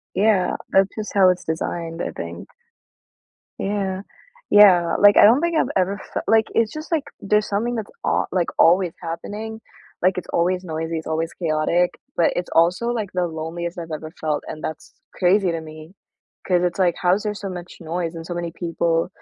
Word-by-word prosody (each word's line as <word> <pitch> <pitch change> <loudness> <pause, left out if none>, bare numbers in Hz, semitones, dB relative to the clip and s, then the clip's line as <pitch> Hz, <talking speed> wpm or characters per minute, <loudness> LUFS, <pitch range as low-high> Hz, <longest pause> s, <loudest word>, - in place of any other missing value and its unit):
Yeah, 195 -2 +2 0.2
that's 195 0 +4
just 215 -1 -4
how 190 -2 +6
it's 180 0 0
designed, 165 +1 -3
I - - -3
think. - - -7 1.1
Yeah, 195 -1 -2 0.5
yeah. 180 -5 +6
Like, 205 0 +7
I - - +8
don't 235 +7 +6
think 340 -1 0
I've - - +1
ever 190 +2 +1
fel - - -2
like, 220 -1 +4
it's 225 -1 +2
just, 310 +3 -8
like, 305 -3 +1 0.2
there's 210 +1 +1
something 225 +4 -1
that's 220 -3 -4 0.2
al - - +1
like, 180 -2 +1
always 175 +1 +4
happening. 210 +6 -6 0.4
Like, 185 +1 +3
it's - - -6
always 180 +2 +1
noisy, 160 -1 -3
it's 160 - -9
always 160 +1 -2
chaotic, 170 +1 +1 0.3
but 170 - +3
it's 175 - -3
also, 180 +8 +3
like, 225 -5 -2
the 180 -1 0
loneliest 170 +2 -5
I've 165 -1 -6
ever 155 +1 -6
felt, 155 -2 -1
and 155 - -7
that's 155 - -6 0.2
crazy 185 +1 +3
to 165 -1 -2
me 155 +2 -11 0.5
'cause 180 -1 +2
it's 180 +1 -1
like, 180 -3 +3
how 180 0 +4
is 205 - -4
there 210 -1 -1
so 200 -1 -6
much 175 -1 -8
noise 170 0 -3
and 165 -1 -7
so 175 - -4
many 170 -1 -4
people, 165 -1 -1
180 Hz, 195 wpm, -22 LUFS, 165-205 Hz, 1.1 s, I